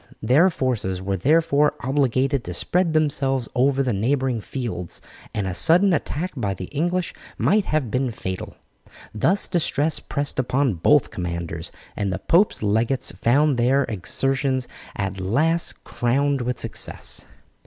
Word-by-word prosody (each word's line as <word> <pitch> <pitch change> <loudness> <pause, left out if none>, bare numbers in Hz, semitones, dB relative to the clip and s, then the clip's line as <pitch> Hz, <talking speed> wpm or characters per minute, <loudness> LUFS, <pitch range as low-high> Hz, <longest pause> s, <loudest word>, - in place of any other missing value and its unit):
Their 140 +11 +5
forces 120 - -2
were 95 +1 -2
therefore 150 - +3
obligated 135 0 +1
to 90 - -5
spread 175 - +1
themselves 140 -5 +1
over 135 +2 +2
the 125 -3 0
neighbouring 125 +3 0
fields, 100 -9 -5 0.3
and 105 - -2
a 95 - -2
sudden 180 - +5
attack 170 +3 -2
by 100 -7 -2
the 90 - -6
English 175 +4 -1 0.2
might 205 0 +2
have 150 -8 -1
been 130 +2 0
fatal. 95 -4 -5 0.6
Thus 170 - +2
distress 160 -3 0
pressed 145 -2 -3
upon 130 0 +1
both 145 - +4
commanders, 85 -2 -4 0.2
and 100 -2 -1
the 95 - -2
pope's 170 - +2
legates 115 +5 0
found 140 +3 +2
their 130 +4 +3
exertions 130 +4 -1 0.3
at 95 -1 -3
last 155 - 0
crowned 140 +3 0
with 125 0 -2
success. - - -3
130 Hz, 140 wpm, -23 LUFS, 110-150 Hz, 0.6 s, Their